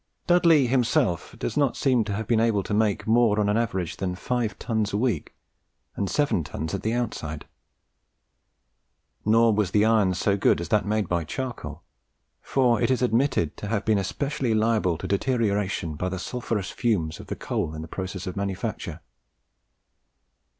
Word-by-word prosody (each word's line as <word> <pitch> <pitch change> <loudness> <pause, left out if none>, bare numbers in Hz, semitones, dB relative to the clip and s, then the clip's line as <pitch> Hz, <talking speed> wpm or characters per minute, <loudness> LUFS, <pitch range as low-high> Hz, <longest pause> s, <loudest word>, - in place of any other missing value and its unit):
Dudley 170 -5 +5
himself 125 - +1
does - - -3
not 140 -4 +1
seem 125 -4 +2
to 105 - -3
have 110 +2 -3
been 115 +1 +2
able 110 -3 +2
to - - -4
make 105 -1 +1
more 110 -2 +3
on 105 - +2
an 105 - +2
average 95 -7 -2
than 90 -2 -2
five 115 +1 -2
tons 110 -4 -1
a - - +1
week, 115 - -1 0.6
and 100 - -2
seven 145 - +1
tons 80 +1 -5
at - - -2
the 110 - -1
outside. 100 -11 -3 1.8
Nor 115 +1 +5
was 105 -3 +1
the 105 +3 +3
iron 105 -5 +3
so 100 +2 +1
good - - +3
as 85 - -5
that 105 -2 +2
made 105 0 0
by 85 -1 0
charcoal; 125 - -6 0.6
for 125 -5 +2
it - - +2
is 130 -1 +1
admitted 120 - +1
to 105 - -6
have 110 0 -1
been 110 -2 +3
especially 135 +4 -1
liable 110 -6 +2
to - - -6
deterioration 100 -6 0
by 90 +5 -3
the 95 - -4
sulphureous 110 -1 -3
fumes 95 -10 -1
of - - -10
the - - -4
coal 80 - -3
in 80 - -5
the - - -8
process 95 +2 -5
of 90 - -5
manufacture. 100 -1 -4
105 Hz, 175 wpm, -25 LUFS, 95-120 Hz, 1.8 s, Dudley